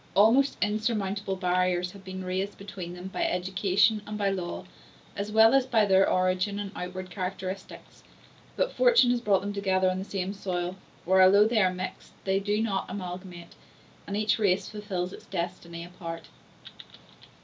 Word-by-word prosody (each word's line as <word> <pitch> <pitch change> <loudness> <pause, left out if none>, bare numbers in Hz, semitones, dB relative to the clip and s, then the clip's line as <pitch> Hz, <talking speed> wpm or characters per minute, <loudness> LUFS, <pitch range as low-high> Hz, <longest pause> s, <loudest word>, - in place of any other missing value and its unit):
Almost 230 +8 +5
insurmountable 210 -2 -1
barriers 180 -1 0
had 200 0 -13
been 185 0 -6
raised 190 +2 -2
between 185 -3 -7
them 180 +1 -7
by - - -2
education 190 +3 +2
and 210 0 -4
by 200 -1 +1
law, 180 -1 -4 0.5
as 205 +1 -4
well 220 +2 +6
as 270 -1 +3
by 225 -4 +3
their 195 -1 +4
origin 185 +2 +1
and 205 -1 -4
outward 180 +1 -6
characteristics; 185 0 -6 0.5
but - - 0
fortune - - +5
has 245 -1 0
brought 200 -5 +2
them 205 +1 -4
together 190 -2 +1
on 185 - -3
the - - -3
same 195 -1 -3
soil, 180 -2 -3 0.3
where, 190 +2 +5
although 200 +3 +7
they 220 -1 +2
are 185 -2 +3
mixed, 185 +1 -7
they 195 0 +1
do 205 +2 0
not 195 -4 -2
amalgamate, 180 -2 -7 0.5
and 200 - -2
each 215 +1 +1
race 195 -2 +2
fulfils 195 -4 -4
its - - -12
destiny 170 -2 -5
apart. 170 -2 -8
190 Hz, 165 wpm, -28 LUFS, 185-205 Hz, 0.5 s, although